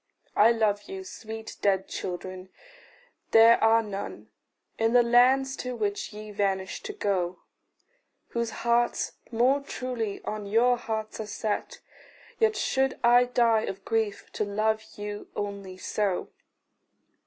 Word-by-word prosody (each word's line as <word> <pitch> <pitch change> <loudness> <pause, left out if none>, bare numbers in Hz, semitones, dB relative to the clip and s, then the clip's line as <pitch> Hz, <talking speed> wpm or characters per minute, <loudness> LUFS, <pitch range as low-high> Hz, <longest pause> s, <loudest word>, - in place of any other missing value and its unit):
I 220 +3 +6
love 215 - 0
you, 380 0 -6
sweet 225 -10 -8
dead 190 -2 +2
children; 185 +1 -6 0.8
there 225 +1 +7
are 225 0 +5
none 205 -2 -7 0.5
In 225 +1 +2
the 245 -1 +6
land 250 +3 +5
to 250 0 -4
which 205 -3 -2
ye 210 0 -9
vanished 195 - -2
to 420 - -4
go, 185 - -1 0.9
Whose 235 -1 -1 0.2
hearts 240 0 +2 0.2
more 250 +5 +3
truly 250 -6 -4
on 210 -1 -4
your 235 +4 +4
hearts 220 -2 -4
are 220 - -4
set 215 0 -3 0.6
Yet 440 -1 +3
should 265 0 0
I 240 +1 +6
die 235 -3 +3
of 195 0 -6
grief 220 -3 -1
to - - -2
love 215 +2 0
you 205 0 -6
only 200 -2 -5
so. 195 -1 -1
220 Hz, 130 wpm, -27 LUFS, 205-240 Hz, 0.9 s, there